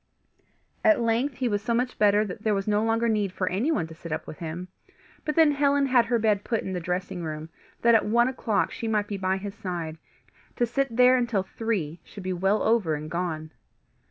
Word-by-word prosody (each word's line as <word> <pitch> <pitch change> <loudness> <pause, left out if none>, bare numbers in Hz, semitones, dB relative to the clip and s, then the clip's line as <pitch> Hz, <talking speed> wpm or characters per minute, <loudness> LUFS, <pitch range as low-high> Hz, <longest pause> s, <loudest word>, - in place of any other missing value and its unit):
At 320 -4 +5
length 235 +4 +1
he 250 0 -1
was 205 -3 0
so 230 +3 0
much 245 +1 -1
better 210 0 +4
that 200 0 -7
there 215 -1 +1
was 195 +1 -2
no 210 0 +2
longer 225 +1 +1
need 210 -4 +1
for 185 0 -2
anyone 210 - 0
to 160 - -10
sit 165 0 -10
up 155 - -3
with 155 - -9
him; 170 +2 -5 0.6
but 300 - -1
then 320 -2 +6
Helen 285 0 +2
had 250 -3 +4
her 240 0 +2
bed 210 -2 +1
put 230 -3 -1
in 190 - -4
the 180 - -2
dressing 180 +1 -3
room, 155 0 -5 0.3
that 235 0 +6
at 225 - +5
one 235 +3 +4
o'clock 230 -5 0
she 230 - -5
might 210 -2 0
be 205 - -4
by 190 0 0
his 200 +1 -6
side, 170 -6 -5 0.6
to 240 - +2
sit 240 0 -2
there 250 +1 +6
until 235 -6 0
three 190 -6 -3
should 200 - -11
be 185 0 -2
well 195 +4 +1
over 215 -9 +2
and 155 +1 -7
gone. 160 -2 -3
210 Hz, 220 wpm, -26 LUFS, 180-235 Hz, 0.6 s, then